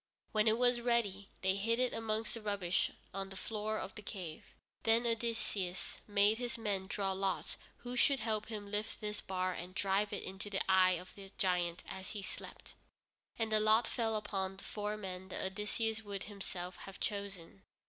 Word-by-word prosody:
When 215 0 +3
it 220 +1 +5
was 245 0 +5
ready, 210 -5 +1
they 190 0 +5
hid 225 +4 +2
it 255 -1 +3
amongst 220 0 -1
the 230 - -5
rubbish 200 -4 +1 0.2
on 195 0 -3
the 195 - -7
floor 215 +2 -2
of 195 - -4
the - - -8
cave. 185 -6 -6 0.4
Then 225 +2 +5
Odysseus 225 -5 -1
made 205 +2 +5
his 245 -1 -2
men 200 -4 -1
draw 195 -1 0
lots 190 -1 0 0.2
who 245 +1 -5
should 270 +2 +5
help 215 -1 0
him 215 -2 -4
to 200 - -10
lift 210 +1 -2
this 210 -1 -2
bar 185 -1 0
and 180 +2 -7
drive 195 +1 +2
it 205 - -2
into 190 +2 -5
the 195 - 0
eye 185 -1 +7
of 180 - -11
the 195 -1 -10
giant 175 -2 +1
as 190 0 -5
he 205 -2 -4
slept, - - -7 0.6
and 225 -1 0
the 215 - +6
lot 220 +2 +5
fell 225 -3 +1
upon 195 -2 -1
the - - -10
four 210 0 -2
men 190 -2 -5
that 190 - -3
Odysseus 215 +3 0
would 200 -2 -4
himself 185 -3 -5
have 195 0 -9
chosen. 195 - -3
205 Hz, 190 wpm, -36 LUFS, 190-220 Hz, 0.6 s, eye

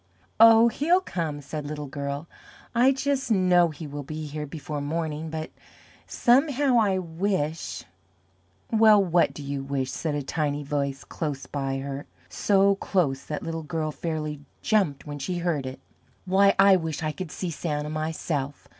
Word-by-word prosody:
"Oh, 225 +1 +8
he'll 315 +10 +3
come," 165 - -4
said 150 +2 -5
Little 150 0 -5
Girl; 140 +2 -5 0.5
"I 245 +3 +5
just 275 -1 -1
know 180 -4 +4
he 155 +1 -8
will 145 0 -6
be 155 +2 -6
here 150 0 -5
before 150 0 -5
morning, 160 +1 -3
but 155 0 -5 0.6
somehow 270 0 +3
I 200 -4 +2
wish 170 -2 -2 0.5
" - - -39
"Well, 220 -2 +6
what 175 -1 +3
do 145 - -9
you 140 0 -3
wish?" 135 -1 -2
said 155 -3 -2
a 145 - -2
Tiny 145 0 -1
Voice 140 -2 -2
close 145 -4 -4
by 135 -2 -3
her 140 +1 -5 0.2
so 200 -1 +3
close 155 -10 0
that 150 - -4
Little 165 0 -3
Girl 155 -1 -3
fairly 155 -2 -4 0.2
jumped 190 -11 +1
when 145 -1 -6
she 175 +6 -3
heard 165 -6 -1
it. 130 - -7 0.5
"Why, 195 +2 +4
I 195 0 +7
wish 160 -2 -4
I 155 - 0
could 175 +3 -6
SEE 180 -3 -4
Santa 150 -1 -3
myself. 155 -2 -3
155 Hz, 165 wpm, -26 LUFS, 145-190 Hz, 0.6 s, Oh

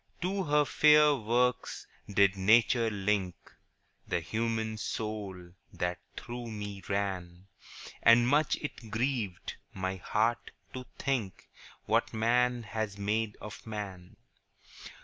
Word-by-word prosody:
To 190 +1 -1
her 150 0 +3
fair 150 0 +6
works 120 +1 0 0.3
did 100 -1 +4
Nature 115 +4 +4
link 100 -3 0 0.7
The - - 0
human 110 +4 -2
soul 100 -4 -5 0.2
that 90 0 -2 0.2
through 120 0 -6
me 105 -2 -6
ran; 95 -3 -3 0.6
And 115 +1 +6
much 145 +4 +3
it 125 -6 -7
grieved 110 -4 -2 0.2
my 95 0 -2
heart 115 +5 0 0.2
to 130 -1 -7
think 120 -9 -2 0.4
What - - +1
man 120 +2 +2
has 110 -1 -4
made 105 +1 -1
of 105 +2 -9
man. 100 -5 -6
110 Hz, 110 wpm, -30 LUFS, 100-120 Hz, 0.7 s, fair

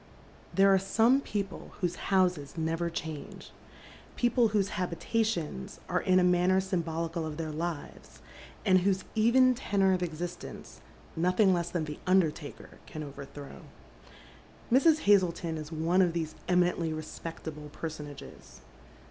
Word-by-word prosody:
Therb 195 - +5
are 195 -1 +6
some 230 +7 +3
people 200 -6 -5
whose 180 -3 -1
houses 180 -7 +1
never 165 +1 -1
change; 160 -3 -7 0.6
people 240 -1 +3
whose 205 -2 +1
habitations 180 - -2
are - - 0
in 185 0 +3
a 185 - +5
manner 180 +1 +4
symbolical 165 -3 -2
of 155 -1 -5
their 160 -2 -3
lives, 165 0 -6 0.5
and 185 -2 +5
whose 190 0 +1
even 250 +4 +5
tenor 200 -6 +1
of 180 - 0
existence 175 +1 -6 0.3
nothing 185 +4 +3
less 175 -1 -1
than 170 -2 -2
the 150 -1 -7
undertaker 170 -5 0
can 155 - -6
overthrow. 140 0 -9 1.1
IMrs. 305 +5 +5
Hazleton 175 -5 +2
is 155 0 -7
one 165 +4 +2
of 175 -3 +2
these 160 -2 -3
eminently 180 -2 +2
respect 155 +1 -7
able 150 -1 -7
personages. 150 -2 -9
175 Hz, 130 wpm, -30 LUFS, 160-195 Hz, 1.1 s, are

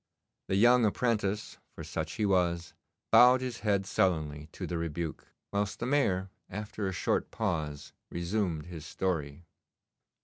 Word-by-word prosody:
The 95 - 0
young 120 +4 +6
apprentice, 105 -2 0 0.2
for - - -7
such 80 -1 -4
he 110 - 0
was, 85 -3 +1 0.4
bowed 125 +1 +8
his 125 -2 -4
head 100 -3 +1
sullenly 80 -6 0
to - - -6
the 85 -1 -2
rebuke, 80 -1 -4 0.2
whilst 100 0 -1
the - - -3
Mayor, 100 -9 +1 0.2
after 105 0 -4
a - - -1
short 90 - 0
pause, 80 -9 -3 0.2
resumed 85 -3 -1
his 85 -3 -8
story. 75 -1 -2
95 Hz, 140 wpm, -30 LUFS, 80-105 Hz, 0.4 s, bowed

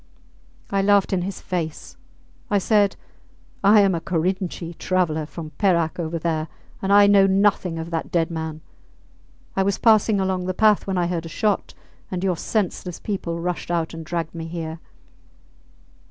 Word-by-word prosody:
I 195 0 +2
laughed 200 0 +3
in 185 - +1
his 190 +2 -5
face. 165 -4 -4 0.5
I 205 - +3
said, 205 0 +3 0.7
I 205 +1 +7
am 195 -2 +3
a 165 - -2
Korinchi 175 0 -2
traveller 160 -5 0
from 155 +1 -8
Perak 170 -5 +2
over 165 0 -2
there, 160 -1 -1 0.3
and 200 +1 +5
know 195 -1 +6
nothing 190 -3 +2
of 165 +1 -6
that 165 -1 -3
dead 170 -1 +1
man. 160 -1 -5 0.9
I 195 - +2
was 195 0 +1
passing 215 -2 +4
along 190 -1 -1
the 185 - -2
path 215 -1 +3
when 190 -1 -1
I 175 - +2
heard 170 -1 -2
a - - -9
shot, 210 +5 -1 0.3
and 185 0 -3
your 185 -2 +1
senseless 180 -2 -2
people 175 -5 -3
rushed 175 -1 -3
out 170 -1 -1
and 165 0 -7
dragged 165 0 -3
me 165 -1 -6
here. 165 -1 -5
180 Hz, 165 wpm, -23 LUFS, 165-195 Hz, 0.9 s, I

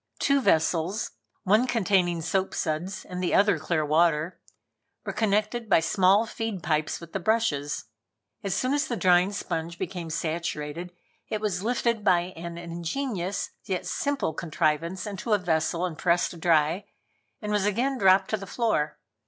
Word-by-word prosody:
Two 280 -1 +2
vessels, 170 +1 +1 0.3
one 215 +6 +4
containing 185 -7 +1
soap 190 +4 0
suds 165 +5 -2
and 180 0 -5
the 180 - +1
other 200 -4 +4
clear 155 0 0
water, 160 +2 +2 0.7
were - - -3
connected 215 +2 0
by - - +6
small 190 +5 +3
feed 225 -5 -4
pipes 155 -1 0
with 170 -1 -12
the 195 - -1
brushes. 175 -8 0 0.6
As 195 -2 -1
soon 255 +6 0
as 290 +1 +1
the 240 - -2
drying 180 +1 +4
sponge 170 -4 -4
became 175 -2 -4
saturated, 160 +1 -3 0.4
it 215 - -1
was 205 -4 -1
lifted 235 0 0
by 180 -2 +2
an 170 0 -7
ingenious 175 +4 -3
yet 185 -2 -2
simple 280 - -1
contrivance 165 +3 -1
into 210 +2 -2
a - - +5
vessel 170 -1 0
and 165 -4 -5
pressed 175 -1 +1
dry, 165 +3 +2 0.5
and 210 -1 -4
was 205 -1 +2
again 250 +6 0
dropped 190 -1 +4
to 215 - +1
the 195 -1 -8
floor. 215 -12 0
185 Hz, 155 wpm, -27 LUFS, 165-210 Hz, 0.7 s, by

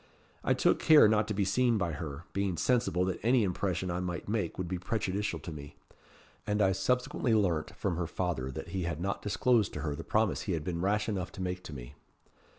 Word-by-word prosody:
I - - +2
took - - +3
care 155 -7 +7
not 105 0 +2
to 110 - -2
be 100 -1 +1
seen 120 +4 +2
by 95 -5 0
her, 75 0 -6
being 95 -2 -1
sensible 115 -4 +2
that 95 - -2
any 120 +1 +3
impression 90 -1 -1
I 85 - -2
might 90 -1 -4
make 105 -5 -1
would 90 - -3
be 90 0 -3
prejudicial 100 +1 -2
to 85 - -8
me; 75 -2 -9 0.7
and 105 0 0
I 95 -2 +4
subsequently 125 +3 +1
learnt 90 -7 0
from 90 -4 -2
her 85 -2 -1
father 85 -7 -2
that 65 - -7
he 95 - -2
had 85 -2 -3
not 100 +3 -2
disclosed 110 +1 +2
to - - -4
her 75 -3 -2
the - - -7
promise 110 -2 +1
he 95 - -2
had 80 -2 -2
been 85 0 -3
rash 105 +3 +1
enough 95 -5 -2
to - - -7
make 90 0 -3
to 75 - -7
me. - - -9
95 Hz, 225 wpm, -31 LUFS, 85-105 Hz, 0.7 s, care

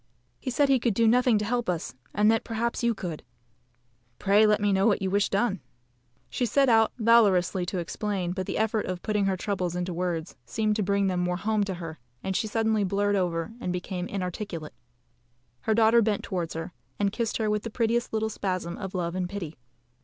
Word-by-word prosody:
"He 260 - -4
said 280 +3 +3
he 270 -2 +4
could 235 -4 0
do 230 +1 +4
nothing 245 0 +4
to 210 - -1
help 240 -1 -1
us, 170 -2 -2 0.2
and 210 +1 +4
that 225 - +1
perhaps 230 +1 -2
you 235 -1 +2
could." 170 -5 -5 1.0
"Pray 205 +2 +4
let 210 0 +3
me 205 -1 +2
know 195 +2 +3
what 210 - +3
you 190 -1 -2
wish 200 +1 +2
done." 200 0 +1 0.7
She - - -3
set 275 +4 +3
out 225 -1 +5
valorously 200 -6 +4
to 185 - -2
explain; 180 +1 -2
but 185 0 -3
the - - -2
effort 220 0 0
of 185 -1 -4
putting 210 -2 +1
her 190 -1 0
troubles 180 -3 -2
into 180 0 -2
words 170 -1 -3
seemed 215 -1 0
to - - +1
bring 200 0 +1
them 185 -2 0
more 180 0 0
home 215 +2 +1
to 190 -2 -3
her, 165 -4 -7 0.2
and 190 0 -2
she 220 - 0
suddenly 220 -1 +1
blurred 205 +1 +1
over 170 -1 -1
and 180 - -2
became 180 0 -3
inarticulate. 180 -4 -5 0.9
Her 220 - 0
daughter 230 +1 +5
bent 210 -2 0
towards 175 -4 -3
her, 165 +2 -5 0.2
and 200 -1 +1
kissed 230 -2 -1
her 220 - 0
with 210 0 +1
the 230 - -5
prettiest 235 +1 0
little 220 0 0
spasm 185 -4 -3
of 190 -1 -6
love 170 -2 -1
and 180 -1 -2
pity. 175 -6 -5
200 Hz, 210 wpm, -27 LUFS, 180-220 Hz, 1.0 s, out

